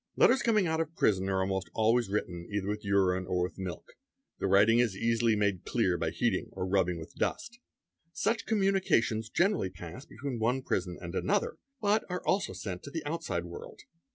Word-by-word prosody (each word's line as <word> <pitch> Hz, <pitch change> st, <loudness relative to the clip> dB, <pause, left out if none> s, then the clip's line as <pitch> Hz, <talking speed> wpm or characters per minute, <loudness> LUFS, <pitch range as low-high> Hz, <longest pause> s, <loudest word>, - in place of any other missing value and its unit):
Letters 260 Hz, -, +5 dB
coming 215 Hz, -5 st, +3 dB
out 160 Hz, -1 st, +1 dB
of 165 Hz, 0 st, -5 dB
prison 95 Hz, -, +2 dB
are 95 Hz, -1 st, +1 dB
almost 95 Hz, 0 st, -1 dB
always 115 Hz, 0 st, +3 dB
written 90 Hz, -4 st, -3 dB
either 100 Hz, -2 st, -2 dB
with 105 Hz, 0 st, -3 dB
'urine 95 Hz, -2 st, +2 dB
or 90 Hz, -1 st, +1 dB
with 90 Hz, -, -5 dB
milk; 90 Hz, -2 st, -6 dB, 0.5 s
the -, -, 0 dB
writing 105 Hz, +4 st, +5 dB
is 115 Hz, -6 st, +1 dB
easily 115 Hz, 0 st, +2 dB
made 100 Hz, -4 st, 0 dB
clear -, -, +1 dB
by -, -, -1 dB
heating -, -, 0 dB
or 90 Hz, -, -3 dB
rubbing 95 Hz, -2 st, +1 dB
with 80 Hz, -, -9 dB
dust. 240 Hz, +1 st, -3 dB, 0.5 s
Such 225 Hz, +6 st, -1 dB
communications 195 Hz, -, +2 dB
generally 175 Hz, -, +2 dB
pass 90 Hz, -, -10 dB
between 125 Hz, 0 st, -5 dB
one 125 Hz, +4 st, +1 dB
prison 90 Hz, -5 st, -2 dB
'and 85 Hz, -1 st, -7 dB
another, 200 Hz, -, 0 dB, 0.2 s
but 215 Hz, 0 st, +2 dB
are 180 Hz, 0 st, -4 dB
also 195 Hz, -, +1 dB
sent 95 Hz, -1 st, -5 dB
to -, -, -9 dB
the 160 Hz, +1 st, -5 dB
outside 145 Hz, -, -2 dB
world. 85 Hz, 0 st, -9 dB
110 Hz, 185 wpm, -30 LUFS, -, 0.5 s, Letters